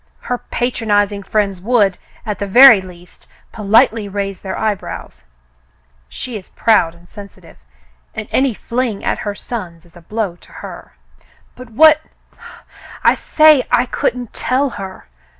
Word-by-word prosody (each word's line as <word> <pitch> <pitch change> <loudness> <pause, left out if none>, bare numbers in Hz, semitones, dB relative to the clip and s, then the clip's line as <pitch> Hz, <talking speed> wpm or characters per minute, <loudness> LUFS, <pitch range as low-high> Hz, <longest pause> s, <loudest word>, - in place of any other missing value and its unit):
Her 245 -1 -3
patronizing 205 -4 -1
friends 195 -2 -1
would, 205 -3 +1 0.3
at 210 -2 -4
the 200 - -3
very 240 0 +8
least, 180 -1 -15 0.2
politely 215 0 +2
raise 195 -1 -4
their 190 -1 -5
eyebrows. 210 - -4 0.8
She 240 - -7
is 185 - -18
proud 170 -7 +2
and 170 0 -20
sensitive, 195 -3 -13 0.6
and 215 - -5
any 260 -4 +1
fling 235 -3 -3
at - - -1
her 205 -1 -4
sons 180 -8 -7
is 170 - -23
a 175 - -14
blow 200 -1 -4
to - - -20
her." - - -11 0.6
"But 250 -1 -12
what 310 +6 +5 0.3
— 470 0 -17
" - - -17
*'I - - +5
say 305 -4 +4
I 245 - +3
couldn't 245 -1 -3
tell 265 +1 0
her. 190 -3 -9
210 Hz, 150 wpm, -17 LUFS, 195-245 Hz, 0.8 s, very